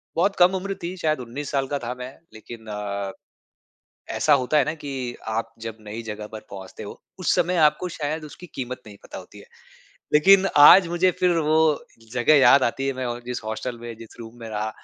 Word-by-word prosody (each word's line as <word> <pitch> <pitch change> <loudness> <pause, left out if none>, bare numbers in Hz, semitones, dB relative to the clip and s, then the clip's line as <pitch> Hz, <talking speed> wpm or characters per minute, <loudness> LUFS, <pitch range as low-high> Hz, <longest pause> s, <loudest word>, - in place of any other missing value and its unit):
बहुत 195 +4 +1
कम 180 +2 +5
उम्र 195 +1 -4
थी 175 +2 -4
शायद 155 -4 0
19 130 +4 -6
साल 135 -1 0
का - - -2
था 120 - -3
मैं 130 +1 -8 0.2
लेकिन 110 +1 -11
अ, 100 -2 -4 1.0
ऐसा 155 - +2
होता 130 +4 +1
है 145 - +4
ना 150 - -2
कि 145 - -6 0.5
आप 115 0 -3
जब 115 -1 -6
नई 110 +3 -6
जगह 105 0 -6
पर 110 - -7
पहुँचते 95 -1 -9
हो - - -7 0.3
उस - - +2
समय 180 +1 +1
आपको 150 +5 -5
शायद 155 +1 -3
उसकी 155 +4 -11
कीमत 125 0 -5
नहीं 105 -1 -12
पता - - -9
होती - - -13
है। - - -14 0.7
लेकिन 195 +5 +6 0.2
आज 190 -2 +9
मुझे 175 +2 +2
फ़िर 180 -2 +3
वो 155 +1 +3 0.6
जगह 125 +4 +3
याद 140 0 +6
आती 135 +3 -1
है 135 - 0
मैं 130 - -2
ओ 120 0 -3
जिस 125 0 -4
हॉस्टल 110 +3 -5
में 120 -1 -8
जिस 115 -1 -13
रूम 115 +1 -11
में 115 - -7
रहा। 110 0 -3
130 Hz, 210 wpm, -23 LUFS, 115-155 Hz, 1.0 s, आज